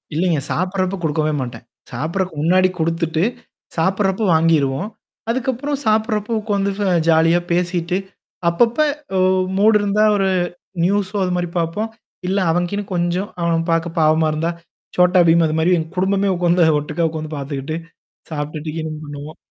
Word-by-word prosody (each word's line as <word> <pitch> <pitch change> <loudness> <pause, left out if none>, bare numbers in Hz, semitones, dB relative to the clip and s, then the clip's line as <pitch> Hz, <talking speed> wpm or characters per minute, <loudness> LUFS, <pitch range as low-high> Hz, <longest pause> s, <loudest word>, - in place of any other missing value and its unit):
இல்லைங்க. 165 -3 +1
சாப்டுறப்ப 185 +1 -1
குடுக்கவே 155 0 0
மாட்டேன். 120 -1 -6 0.3
சாப்பிடறதுக்கு 160 +5 -3
முன்னாடி 185 +2 +4
குடுத்துட்டு 165 0 0 0.5
சாப்டுறப்போ 190 +4 +1
வாங்கிருவோம். 160 0 +2 0.4
அதுக்கப்புறம் 260 +3 -1
சாப்படுறப்போ 215 0 +1
உட்காந்து 200 -2 0 0.4
ஜாலியா 165 +1 +4
பேசிட்டு. 175 0 0 0.5
அப்பப்ப 230 - +2 0.4
ஒ - - +3 0.4
மூடு 215 +2 +5
இருந்தா 205 +1 +2
ஒரு 195 -1 +1 0.5
நியூஸோ 200 +2 0
அது 180 - -1
மாரி 175 -1 -1
பார்ப்போம். 170 +7 -2 0.4
இல்ல 195 +1 +1
அவனுக்குகீனு 180 +4 -1
கொஞ்சம் 175 +3 -1
அவன் 165 0 0
பார்க்க 165 0 -1
பாவமா 155 0 +4
இருந்தா. 165 +2 -1 0.5
சோட்டாபீம் 175 -2 +5
அது 155 - -2
மாரி 170 +3 +3
எ - - 0 0.2
குடும்பமே 195 +1 +2
உட்கார்ந்து 175 -1 +3
ஒட்டுக்கா 160 +3 -1
உட்கார்ந்து 155 -1 -5
பார்த்துக்கிட்டு. 140 +2 -4 0.6
சாப்ட்டுட்டுக்கீனும் 155 +1 -4
பண்ணுவோம். 145 +1 -8
175 Hz, 125 wpm, -19 LUFS, 160-195 Hz, 0.6 s, மூடு